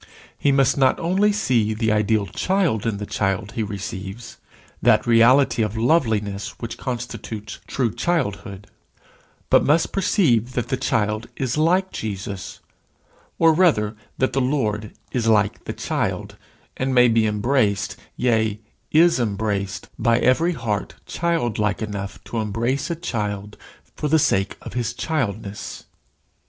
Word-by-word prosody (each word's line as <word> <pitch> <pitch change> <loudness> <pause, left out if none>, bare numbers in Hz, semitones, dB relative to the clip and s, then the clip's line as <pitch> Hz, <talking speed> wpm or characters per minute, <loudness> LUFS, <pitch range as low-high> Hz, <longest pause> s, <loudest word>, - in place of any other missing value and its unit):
He 145 - +2
must 135 0 +3
not 130 -1 +3
only 190 +5 +2
see 120 - +1
the 110 0 +1
ideal 105 0 +2
child 170 - 0
in 110 -3 -1
the 105 - -5
child 100 +1 -1
he 115 - -3
receives 100 +1 -6 0.4
that 110 0 +4
reality 120 +2 +5
of 105 0 -1
loveliness 110 -7 +1
which 115 -1 -5
constitutes 115 -4 -6
true 120 -5 -1
childhood, 105 - -2 0.9
but - - +6
must 155 +3 +2
perceive 130 - +2
that 125 - -2
the - - +1
child 105 +1 -1
is 130 -3 -1
like 180 +5 +2
Jesus, 100 -2 -5 0.8
or 165 -1 +5
rather, 130 - +3 0.2
that 130 -1 +1
the 135 - +1
Lord 110 -6 -1 0.2
is 120 -3 -1
like 105 -2 +2
the - - -3
child, - - -3 0.4
and 130 0 -1
may 125 0 +7
be 115 -1 +3
embraced, 105 -1 +1 0.2
yea, 110 -4 +1 0.3
is 165 -1 +5
embraced, 100 -3 -2
by 115 0 +3
every 165 +9 +3
heart 115 -8 -3
childlike 120 -12 -1
enough 100 -2 -5
to 120 - -6
embrace 115 - -1
a 170 - -1
child 105 - -4 0.4
for 150 - -2
the 160 +2 +4
sake 95 -9 +1
of - - -8
his 120 -1 -2
childness. 105 - -3
115 Hz, 140 wpm, -22 LUFS, 105-135 Hz, 0.9 s, may